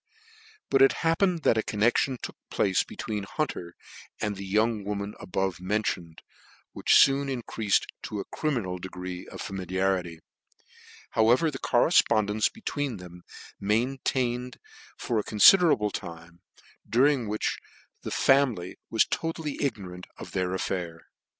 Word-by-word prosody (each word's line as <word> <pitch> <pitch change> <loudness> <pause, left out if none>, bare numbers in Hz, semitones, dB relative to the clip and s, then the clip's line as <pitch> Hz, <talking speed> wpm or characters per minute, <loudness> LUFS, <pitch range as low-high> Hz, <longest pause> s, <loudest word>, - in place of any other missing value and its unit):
But 135 - +4
it 135 - +7
happened 165 0 +2
that 110 - +3
a - - +3
connection 120 +5 +1
took - - -7
place 95 -2 +2
between 105 -2 -5
Hunter 95 - -4 0.4
and 105 -1 -2
the 100 0 -7
young 110 +2 +1
woman 100 0 -4
above 95 -1 -2
mentioned, 90 -4 -2 0.5
which - - -2
foon 140 0 +5
increated 115 -5 0 0.2
to 105 - -5
a 100 - -4
criminal 115 - -2
degree 90 0 -7
of - - -9
familiarity, 95 -2 -2 0.9
however 120 +8 +3
the 130 - -7
correfpond 120 - +3
cnce 110 0 +1
between 145 - -4
them 90 -1 -11
was - - -15
maintained 125 +3 -1 0.4
for 115 -3 -1
a - - -2
confider 170 - +7
able 105 -5 +1
time, 85 -1 -8 0.5
during 125 +1 +3
which 105 +1 -2 0.4
the - - -5
family 125 -10 +2
was 110 - +3
totally 165 -2 -3
ignorant 90 -9 -4
of - - -9
the 90 -1 -1
affair. 90 -3 -3
105 Hz, 135 wpm, -27 LUFS, 95-130 Hz, 0.9 s, it